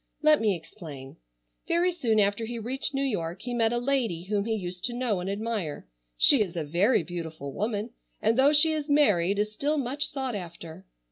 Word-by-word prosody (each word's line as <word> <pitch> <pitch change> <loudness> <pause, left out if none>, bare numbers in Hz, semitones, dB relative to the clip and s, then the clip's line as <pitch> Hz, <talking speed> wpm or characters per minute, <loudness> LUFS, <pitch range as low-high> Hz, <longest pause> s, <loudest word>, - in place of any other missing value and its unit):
Let 305 -3 +5
me 210 -3 +2
explain. 155 -6 -10 0.5
Very 345 +2 +2
soon 240 -11 +1
after 205 +2 +1
he 240 +1 -4
reached 250 +6 -2
New 270 - 0
York 180 -8 -3
he 245 0 -4
met 225 -2 +2
a 240 - 0
lady 240 -9 0
whom 200 +1 -1
he 225 -1 0
used 180 -3 -6
to 245 - -1
know 240 -5 -1
and 180 +2 -4
admire. 200 - -3 0.3
She 270 - +6
is 185 -5 -2
a 165 - -1
very 175 - +2
beautiful 160 -5 -6
woman, 215 +2 -2 0.3
and 220 +2 +2
though 270 +3 +5
she 305 +2 +5
is 305 -1 -3
married 200 - +3
is 210 +1 -1
still 290 +7 0
much 275 +2 -1
sought 265 -4 -3
after. 170 -1 -8
215 Hz, 200 wpm, -27 LUFS, 180-260 Hz, 0.5 s, She